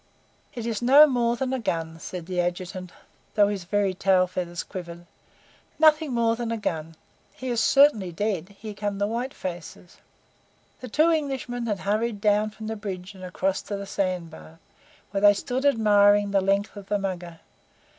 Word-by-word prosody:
"It 235 Hz, -2 st, -5 dB
is 230 Hz, -2 st, -2 dB
no 275 Hz, +5 st, +8 dB
more 240 Hz, -4 st, +1 dB
than 260 Hz, +1 st, -2 dB
a 260 Hz, -, -1 dB
gun," 165 Hz, -6 st, -3 dB
said 175 Hz, 0 st, -7 dB
the 180 Hz, 0 st, -3 dB
Adjutant, 180 Hz, +1 st, -4 dB, 0.4 s
though 205 Hz, -1 st, +5 dB
his 195 Hz, -4 st, -4 dB
very 200 Hz, 0 st, +1 dB
tail 185 Hz, 0 st, +3 dB
feathers 175 Hz, -1 st, -4 dB
quivered. 175 Hz, -2 st, -8 dB, 0.7 s
"Nothing 310 Hz, -1 st, +4 dB
more 230 Hz, -1 st, +2 dB
than 235 Hz, -1 st, -4 dB
a 230 Hz, -, -1 dB
gun. 165 Hz, -5 st, -4 dB, 0.4 s
He 255 Hz, -, -6 dB
is 235 Hz, -2 st, +1 dB
certainly 250 Hz, -10 st, +4 dB
dead. 195 Hz, 0 st, -3 dB
Here 215 Hz, 0 st, -7 dB
come 205 Hz, 0 st, -3 dB
the 200 Hz, -, +1 dB
white 235 Hz, +5 st, -3 dB
faces." 175 Hz, -3 st, -8 dB, 0.8 s
The 255 Hz, -, -8 dB
two 310 Hz, +8 st, +3 dB
Englishmen 265 Hz, -6 st, -2 dB
had 205 Hz, -4 st, -2 dB
hurried 210 Hz, +2 st, -1 dB
down 210 Hz, +1 st, +2 dB
from 220 Hz, +1 st, -10 dB
the 220 Hz, +1 st, -3 dB
bridge 195 Hz, -2 st, -6 dB
and 190 Hz, -1 st, -12 dB
across 190 Hz, +1 st, -1 dB
to 205 Hz, -, -5 dB
the 200 Hz, -, -6 dB
sand 185 Hz, -4 st, -2 dB
bar, 80 Hz, +1 st, -13 dB, 0.5 s
where 195 Hz, -1 st, -1 dB
they 205 Hz, 0 st, +7 dB
stood 255 Hz, +6 st, -3 dB
admiring 205 Hz, -4 st, +4 dB
the 195 Hz, -1 st, +3 dB
length 195 Hz, +2 st, 0 dB
of 200 Hz, -1 st, -10 dB
the 205 Hz, -, +2 dB
Mugger. 180 Hz, -4 st, -5 dB
205 Hz, 180 wpm, -25 LUFS, 185-230 Hz, 0.8 s, no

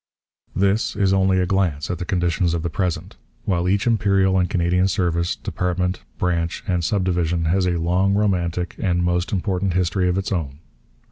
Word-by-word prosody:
This 100 Hz, +3 st, +1 dB
is 95 Hz, -2 st, +2 dB
only 95 Hz, -1 st, +3 dB
a 90 Hz, -, +2 dB
glance 90 Hz, -6 st, 0 dB
at 90 Hz, -, -4 dB
the 90 Hz, -, -3 dB
conditions 85 Hz, -2 st, 0 dB
of 80 Hz, -, -3 dB
the 85 Hz, -, -2 dB
present; 90 Hz, +2 st, -3 dB, 0.3 s
while 90 Hz, -4 st, 0 dB
each 100 Hz, +1 st, +1 dB
Imperial 100 Hz, -5 st, +2 dB
and 90 Hz, -, +1 dB
Canadian 90 Hz, -1 st, +2 dB
service, 85 Hz, -2 st, 0 dB
department, 90 Hz, 0 st, -2 dB, 0.2 s
branch, 85 Hz, -2 st, -1 dB
and 90 Hz, -5 st, 0 dB
sub 100 Hz, +3 st, 0 dB
division 85 Hz, -2 st, 0 dB
has 90 Hz, +3 st, +2 dB
a 85 Hz, -1 st, 0 dB
long, 90 Hz, +4 st, +1 dB
romantic, 90 Hz, -4 st, 0 dB
and 90 Hz, -4 st, 0 dB
most 90 Hz, +3 st, 0 dB
important 95 Hz, -1 st, -1 dB
history 90 Hz, +1 st, +1 dB
of 90 Hz, -, 0 dB
its 95 Hz, -, -2 dB
own. 75 Hz, -7 st, -2 dB
90 Hz, 180 wpm, -22 LUFS, 85-95 Hz, 0.3 s, only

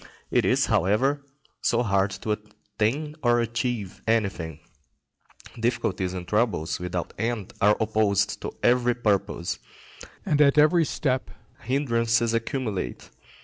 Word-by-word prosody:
It -, -, +3 dB
is, -, -, +3 dB
however, 130 Hz, -, +2 dB, 0.4 s
so 120 Hz, 0 st, +2 dB
hard 100 Hz, -3 st, +2 dB, 0.2 s
to 110 Hz, -, 0 dB
attain 110 Hz, +7 st, -3 dB
or 120 Hz, -1 st, +3 dB
achieve 120 Hz, -3 st, -2 dB
anything; 95 Hz, -9 st, 0 dB, 1.0 s
difficulties 95 Hz, -5 st, -1 dB
and 90 Hz, -1 st, -6 dB
troubles 105 Hz, -6 st, 0 dB
without 90 Hz, -1 st, -4 dB
end 115 Hz, -4 st, -2 dB
are 105 Hz, +1 st, +5 dB
opposed 110 Hz, -2 st, +1 dB
to -, -, -4 dB
every 120 Hz, 0 st, +3 dB
purpose, 100 Hz, -7 st, -1 dB, 0.7 s
and 150 Hz, 0 st, +2 dB
at 140 Hz, 0 st, +5 dB
every 155 Hz, +3 st, +5 dB
step 130 Hz, -3 st, -1 dB, 0.3 s
hindrances 115 Hz, -4 st, +1 dB
accumulate. 115 Hz, -, -3 dB
115 Hz, 115 wpm, -25 LUFS, 100-125 Hz, 1.0 s, are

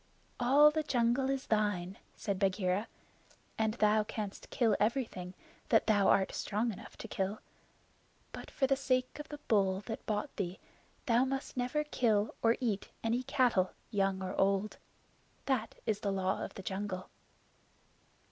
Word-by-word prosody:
"All 280 Hz, +5 st, +6 dB
the 310 Hz, +1 st, 0 dB
jungle 255 Hz, -2 st, +1 dB
is 270 Hz, -1 st, -1 dB
thine," 205 Hz, -4 st, 0 dB, 0.2 s
said 200 Hz, -2 st, -3 dB
Bagheera, 190 Hz, +1 st, +1 dB, 0.7 s
"and 220 Hz, 0 st, +1 dB
thou 215 Hz, -1 st, +3 dB
canst 210 Hz, -1 st, -6 dB
kill 225 Hz, -4 st, +2 dB
everything 210 Hz, -6 st, -1 dB, 0.3 s
that 225 Hz, -, +4 dB
thou 205 Hz, -3 st, +4 dB
art 190 Hz, -, +3 dB
strong 220 Hz, +3 st, -1 dB
enough -, -, -12 dB
to -, -, -7 dB
kill; 195 Hz, 0 st, -2 dB, 0.9 s
but -, -, -8 dB
for 270 Hz, -, +1 dB
the 270 Hz, +1 st, +3 dB
sake 255 Hz, 0 st, 0 dB
of 295 Hz, -, -7 dB
the 295 Hz, -, -6 dB
bull 195 Hz, -4 st, +2 dB
that 220 Hz, +2 st, -6 dB
bought 215 Hz, +6 st, -2 dB
thee 190 Hz, -2 st, -2 dB, 0.5 s
thou 240 Hz, +1 st, +4 dB
must 270 Hz, +1 st, -3 dB
never 250 Hz, +4 st, 0 dB
kill 220 Hz, -7 st, +1 dB
or 230 Hz, 0 st, +4 dB
eat 220 Hz, -6 st, -1 dB
any 230 Hz, +2 st, +1 dB
cattle 255 Hz, -8 st, +2 dB, 0.2 s
young 195 Hz, -2 st, +1 dB
or 185 Hz, 0 st, -3 dB
old. 195 Hz, +2 st, +1 dB, 0.7 s
That 250 Hz, -5 st, 0 dB
is 210 Hz, -2 st, 0 dB
the 200 Hz, -2 st, -1 dB
Law 190 Hz, 0 st, 0 dB
of -, -, -7 dB
the 195 Hz, -, -8 dB
Jungle." 190 Hz, -1 st, -4 dB
215 Hz, 155 wpm, -33 LUFS, 195-250 Hz, 0.9 s, All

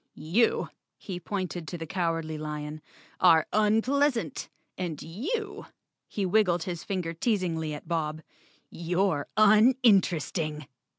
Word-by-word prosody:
You," 180 Hz, +10 st, +1 dB, 0.3 s
he 185 Hz, -3 st, -6 dB
pointed 180 Hz, -3 st, -4 dB
to 175 Hz, -, -5 dB
the 165 Hz, -, -6 dB
Cowardly 165 Hz, -2 st, -2 dB
Lion, 150 Hz, 0 st, -5 dB, 0.4 s
"are 165 Hz, -3 st, +6 dB
unpleasant. 225 Hz, -, +1 dB, 0.3 s
And 170 Hz, -5 st, -4 dB
you," 390 Hz, -, -4 dB, 0.4 s
he 200 Hz, -, -2 dB
wiggled 180 Hz, -3 st, +2 dB
his 175 Hz, -1 st, -5 dB
finger 180 Hz, -4 st, -3 dB
teasingly 165 Hz, -5 st, -1 dB
at 150 Hz, -, -11 dB
Bob, 155 Hz, -2 st, -2 dB, 0.5 s
"you're 175 Hz, -2 st, 0 dB
uninteresting!" 200 Hz, -, +3 dB
175 Hz, 110 wpm, -28 LUFS, 160-210 Hz, 0.5 s, are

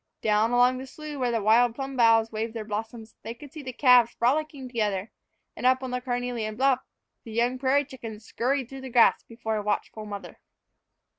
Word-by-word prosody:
Down 215 Hz, +1 st, +3 dB
along 245 Hz, +1 st, +3 dB
the 265 Hz, -, -8 dB
slough 300 Hz, +1 st, -8 dB
where 250 Hz, -1 st, +1 dB
the 230 Hz, -3 st, -1 dB
wild 230 Hz, +2 st, +4 dB
plum 270 Hz, 0 st, -5 dB
boughs 225 Hz, -2 st, +4 dB
waved 220 Hz, +1 st, -4 dB
their 220 Hz, -2 st, -4 dB
blossoms 220 Hz, +1 st, -6 dB
they 225 Hz, +3 st, -7 dB
could 280 Hz, +3 st, -13 dB
see 310 Hz, -, -7 dB
the 260 Hz, -2 st, -6 dB
calves 245 Hz, -2 st, +5 dB
frolicking 280 Hz, +2 st, 0 dB
together; 210 Hz, -4 st, -2 dB, 0.4 s
and -, -, -9 dB
up 260 Hz, +1 st, +3 dB
on 255 Hz, -, -4 dB
the 250 Hz, 0 st, -2 dB
carnelian 245 Hz, -3 st, -3 dB
bluff, 260 Hz, +1 st, +3 dB, 0.4 s
the 225 Hz, -, -10 dB
young 240 Hz, +3 st, 0 dB
prairie 275 Hz, +2 st, +2 dB
chickens 225 Hz, -5 st, -9 dB
scurried 260 Hz, +1 st, -1 dB
through 270 Hz, +1 st, -9 dB
the 265 Hz, -, -7 dB
grass 235 Hz, -1 st, +5 dB
before 220 Hz, -1 st, -4 dB
a -, -, -1 dB
watchful 210 Hz, +1 st, -3 dB
mother. 205 Hz, -1 st, -8 dB
240 Hz, 200 wpm, -26 LUFS, 220-260 Hz, 0.4 s, calves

